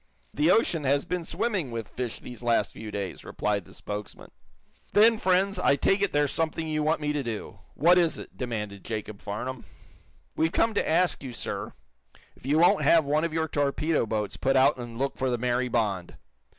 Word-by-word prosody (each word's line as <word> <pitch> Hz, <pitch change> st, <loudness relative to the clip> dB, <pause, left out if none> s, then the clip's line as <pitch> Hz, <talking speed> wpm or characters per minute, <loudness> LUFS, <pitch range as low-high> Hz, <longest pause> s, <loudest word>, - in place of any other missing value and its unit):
The 150 Hz, +4 st, +2 dB
ocean 180 Hz, -6 st, +3 dB
has 140 Hz, +1 st, +2 dB
been 180 Hz, 0 st, -2 dB
swarming 190 Hz, -, -1 dB
with 115 Hz, -2 st, -5 dB
fish 125 Hz, -1 st, -5 dB
these 125 Hz, -1 st, -10 dB
last 115 Hz, -3 st, +1 dB
few 110 Hz, -, -8 dB
days," 100 Hz, -2 st, -5 dB
replied 100 Hz, -3 st, -2 dB
the -, -, -16 dB
spokesman. 105 Hz, 0 st, -7 dB, 0.6 s
"Then, 220 Hz, +1 st, +6 dB
friends, 190 Hz, +1 st, +2 dB
I 140 Hz, -, +4 dB
take 195 Hz, +8 st, +2 dB
it 200 Hz, -, +1 dB
there's 145 Hz, -1 st, +1 dB
something 160 Hz, 0 st, -1 dB
you 155 Hz, -1 st, -1 dB
want 155 Hz, +1 st, +1 dB
me 150 Hz, 0 st, 0 dB
to 145 Hz, -, -1 dB
do. 115 Hz, -5 st, -6 dB, 0.2 s
What 175 Hz, +5 st, +5 dB
is 170 Hz, -2 st, +2 dB
it?" -, -, -10 dB
demanded 105 Hz, -5 st, -5 dB
Jacob 105 Hz, -2 st, -5 dB
Farnum. 125 Hz, +5 st, -5 dB, 0.7 s
"We've 160 Hz, +1 st, +1 dB
come 225 Hz, +4 st, +2 dB
to -, -, 0 dB
ask 175 Hz, +3 st, +2 dB
you, 130 Hz, -3 st, -7 dB
sir, -, -, -4 dB, 0.6 s
if -, -, -12 dB
you 145 Hz, +3 st, +3 dB
won't 180 Hz, +5 st, +5 dB
have 165 Hz, -3 st, +5 dB
one 150 Hz, +2 st, +1 dB
of 170 Hz, -, -1 dB
your 160 Hz, 0 st, 0 dB
torpedo 145 Hz, -1 st, 0 dB
boats 105 Hz, -2 st, -2 dB
put 135 Hz, 0 st, +1 dB
out 135 Hz, +2 st, +5 dB
and 120 Hz, -2 st, -7 dB
look 135 Hz, +2 st, -2 dB
for 130 Hz, 0 st, +1 dB
the 120 Hz, -, 0 dB
'Mary 125 Hz, +1 st, 0 dB
Bond.' 105 Hz, -7 st, -1 dB
140 Hz, 200 wpm, -27 LUFS, 115-165 Hz, 0.7 s, Then